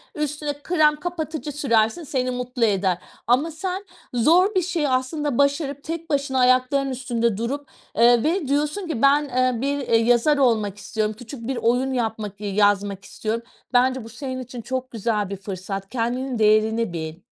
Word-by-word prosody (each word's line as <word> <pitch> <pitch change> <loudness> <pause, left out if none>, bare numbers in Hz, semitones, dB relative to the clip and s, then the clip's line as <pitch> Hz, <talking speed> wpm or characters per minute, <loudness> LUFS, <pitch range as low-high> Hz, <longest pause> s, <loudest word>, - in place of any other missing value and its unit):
üstüne 300 0 -2
krem 310 -4 +3
kapatıcı 315 -2 -4
sürersin 245 +1 +1
seni 255 -3 -1
mutlu 250 -1 -1
eder 190 -4 +1 0.3
ama 275 +7 +3
sen 375 +5 -4 0.3
zor 350 - +4
bir 370 - +4
şeyi 325 -5 -1
aslında 260 +1 -1
başarıp 280 0 +1
tek 330 +1 -5
başına 275 -2 0
ayaklarının 255 +2 +3
üstünde 235 -4 -1
durup, 275 +5 -3 0.3
eee, 235 0 +5
ve 325 -1 0
diyorsun 300 +7 0
ki 275 -8 -3
"Ben, 285 +2 +5
eee, 255 -1 +1
bir, 280 +1 0
eee, 230 - +3
yazar 240 +6 +3
olmak 215 -7 +2
istiyorum. 215 +1 -2
Küçük 240 -1 -9
bir 265 -2 -2
oyun 250 +3 +1
yapmak 220 -4 -3
iii, 200 -2 -3
yazmak 205 -1 +2
istiyorum." 225 +2 -3 0.3
Bence 255 0 +3
bu 225 - -10
senin 260 +2 -5
için 245 -1 -8
çok 255 +2 -4
güzel 215 -3 -1
bir 200 - -4
fırsat. 195 0 -6
Kendinin 250 +1 -2
değerini 215 -1 +3
bil. 160 +1 -5
255 Hz, 165 wpm, -23 LUFS, 225-290 Hz, 0.3 s, eee